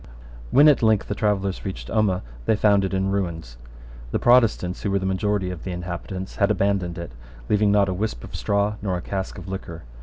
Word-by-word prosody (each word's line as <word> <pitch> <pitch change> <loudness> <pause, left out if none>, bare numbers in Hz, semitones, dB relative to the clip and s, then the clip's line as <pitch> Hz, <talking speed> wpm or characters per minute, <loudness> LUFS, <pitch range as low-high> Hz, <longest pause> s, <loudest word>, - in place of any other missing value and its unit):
When 145 - +6
at 150 - +5
length 110 -3 +2
the - - 0
travellers 100 -3 -1
reached 95 - -6
Omagh, 105 -4 +1 0.2
they 110 - +4
found 100 -2 +3
it 95 - -1
in 95 0 0
ruins. 85 -11 -3 0.5
The - - 0
Protestants, 115 -7 +3
who 105 - -1
were 100 - +1
the 95 - -2
majority 95 0 0
of 90 -3 -8
the - - -5
inhabitants, 90 +1 -6
had 100 -1 +3
abandoned 100 -4 0
it, 85 -4 -6 0.4
leaving 105 0 +3
not 100 -1 +4
a 95 - -1
wisp 90 - -3
of - - -9
straw 100 +1 0
nor 95 -3 -1
a - - -5
cask 95 -1 -4
of 90 - -9
liquor. 95 -3 -6
95 Hz, 210 wpm, -23 LUFS, 90-105 Hz, 0.5 s, When